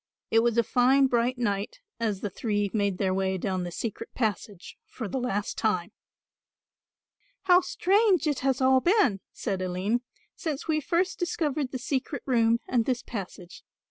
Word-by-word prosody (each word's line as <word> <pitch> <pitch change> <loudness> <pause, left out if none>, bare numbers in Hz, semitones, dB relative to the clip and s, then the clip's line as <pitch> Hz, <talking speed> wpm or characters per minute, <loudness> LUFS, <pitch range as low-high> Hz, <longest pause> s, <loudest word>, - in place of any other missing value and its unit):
It 225 - +5
was 235 0 +1
a 235 - +5
fine 255 +4 +4
bright 245 0 +1
night 205 - -2 0.2
as 215 -4 -1
the 205 - -2
three 205 -1 -1
made 200 -3 0
their 190 -1 0
way 190 0 0
down 185 0 -2
the 175 - -5
secret 220 +5 -5
passage 205 -4 -3
for 230 - -6
the 260 - -3
last 205 -5 -2
time. 185 -6 0 1.5
"How 360 -1 +6
strange 385 +1 +2
it 295 -3 0
has 265 0 0
all 260 0 +5
been," 345 - +3
said 195 -5 -3
Aline, 185 +6 -1 0.3
"since 310 -3 -4
we 310 -1 +2
first 350 +5 0
discovered 300 -6 -1
the 260 - -3
secret 270 +3 -3
room 230 -3 +3
and 235 -3 +1
this 250 -2 -1
passage. 185 -4 -8
235 Hz, 165 wpm, -27 LUFS, 200-275 Hz, 1.5 s, How